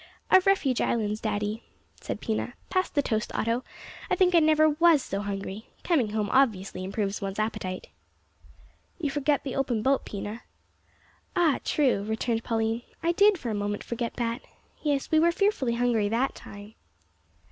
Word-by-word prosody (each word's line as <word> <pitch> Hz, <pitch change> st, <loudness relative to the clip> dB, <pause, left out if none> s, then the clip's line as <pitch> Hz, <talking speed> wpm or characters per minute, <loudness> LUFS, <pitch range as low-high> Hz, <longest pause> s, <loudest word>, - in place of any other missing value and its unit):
"Of 375 Hz, 0 st, +6 dB
Refuge 285 Hz, -11 st, +2 dB
Islands, 215 Hz, -2 st, 0 dB
daddy," 210 Hz, +1 st, -2 dB, 0.4 s
said -, -, -5 dB
Pina; 225 Hz, +2 st, -2 dB, 0.2 s
"pass 370 Hz, 0 st, +1 dB
the 285 Hz, -, 0 dB
toast, 215 Hz, -3 st, -1 dB
Otto, 230 Hz, +3 st, 0 dB, 0.5 s
I -, -, +3 dB
think 365 Hz, -2 st, +3 dB
I 340 Hz, -, +7 dB
never 310 Hz, 0 st, +5 dB
was 310 Hz, -1 st, +4 dB
so 195 Hz, +1 st, -3 dB
hungry. 200 Hz, +1 st, -5 dB, 0.2 s
Coming 275 Hz, -11 st, +2 dB
home 210 Hz, -1 st, -1 dB
obviously 200 Hz, -8 st, +1 dB
improves 200 Hz, +1 st, -2 dB
one's 195 Hz, 0 st, -4 dB
appetite." 200 Hz, -4 st, -3 dB, 1.1 s
"You 300 Hz, -5 st, -2 dB
forget 290 Hz, 0 st, +1 dB
the 270 Hz, -, -4 dB
open 245 Hz, -5 st, 0 dB
boat, 270 Hz, +2 st, +2 dB
Pina." 210 Hz, +3 st, -6 dB, 0.9 s
"Ah, 335 Hz, -6 st, +3 dB
true," 265 Hz, -9 st, +2 dB
returned 225 Hz, +2 st, -1 dB
Pauline, 225 Hz, 0 st, -1 dB, 0.2 s
"I 335 Hz, -, +3 dB
did 405 Hz, +3 st, +5 dB
for 245 Hz, -8 st, -4 dB
a -, -, -2 dB
moment 205 Hz, 0 st, -2 dB
forget 235 Hz, 0 st, -4 dB
that. 235 Hz, +1 st, -2 dB, 0.4 s
Yes, 285 Hz, -3 st, -1 dB
we 315 Hz, -, +5 dB
were 340 Hz, +2 st, +4 dB
fearfully 340 Hz, -, +1 dB
hungry 235 Hz, -4 st, +1 dB
that 240 Hz, +5 st, 0 dB
time." 205 Hz, +1 st, -11 dB
235 Hz, 160 wpm, -27 LUFS, 210-295 Hz, 1.1 s, I